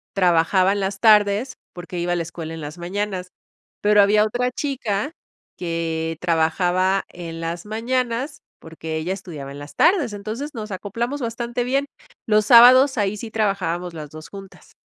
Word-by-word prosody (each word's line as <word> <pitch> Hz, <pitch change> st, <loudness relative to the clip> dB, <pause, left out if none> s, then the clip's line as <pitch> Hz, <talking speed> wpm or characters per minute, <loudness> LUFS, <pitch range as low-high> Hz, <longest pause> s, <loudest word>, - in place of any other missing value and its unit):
trabajaba 185 Hz, +1 st, +3 dB
en 200 Hz, -, -1 dB
las 195 Hz, 0 st, -3 dB
tardes 215 Hz, +3 st, +4 dB, 0.2 s
porque 175 Hz, 0 st, -7 dB
iba 175 Hz, +1 st, 0 dB
a -, -, +1 dB
la 170 Hz, -, -1 dB
escuela 165 Hz, -1 st, -7 dB
en 165 Hz, -, -7 dB
las 150 Hz, +2 st, -7 dB
mañanas, 185 Hz, +1 st, -3 dB, 0.5 s
pero 210 Hz, 0 st, +5 dB
había 210 Hz, +1 st, +4 dB
otra 245 Hz, +3 st, -1 dB
chica 255 Hz, -4 st, -2 dB, 0.5 s
que 165 Hz, -2 st, -3 dB
trabajaba 180 Hz, +3 st, +1 dB
en 165 Hz, -2 st, -8 dB
las 170 Hz, +3 st, -4 dB
mañanas 245 Hz, +5 st, -2 dB, 0.2 s
porque 160 Hz, 0 st, -7 dB
ella 165 Hz, +4 st, -2 dB
estudiaba 150 Hz, -8 st, -8 dB
en 140 Hz, -, -9 dB
las 145 Hz, +1 st, -11 dB
tardes. 330 Hz, -, +3 dB
Entonces 220 Hz, +9 st, -5 dB
nos 215 Hz, -2 st, -6 dB
acoplamos 235 Hz, +8 st, -3 dB
bastante 235 Hz, +1 st, -3 dB
bien, 270 Hz, +3 st, 0 dB, 0.4 s
los 215 Hz, -1 st, +3 dB
sábados, 255 Hz, +4 st, +8 dB
ahí 205 Hz, -1 st, 0 dB
sí 230 Hz, -, -7 dB
trabajábamos 185 Hz, -5 st, -1 dB
las 150 Hz, -2 st, -8 dB
dos 155 Hz, 0 st, -11 dB
juntas. 195 Hz, -1 st, -13 dB
195 Hz, 160 wpm, -22 LUFS, 170-230 Hz, 0.5 s, sábados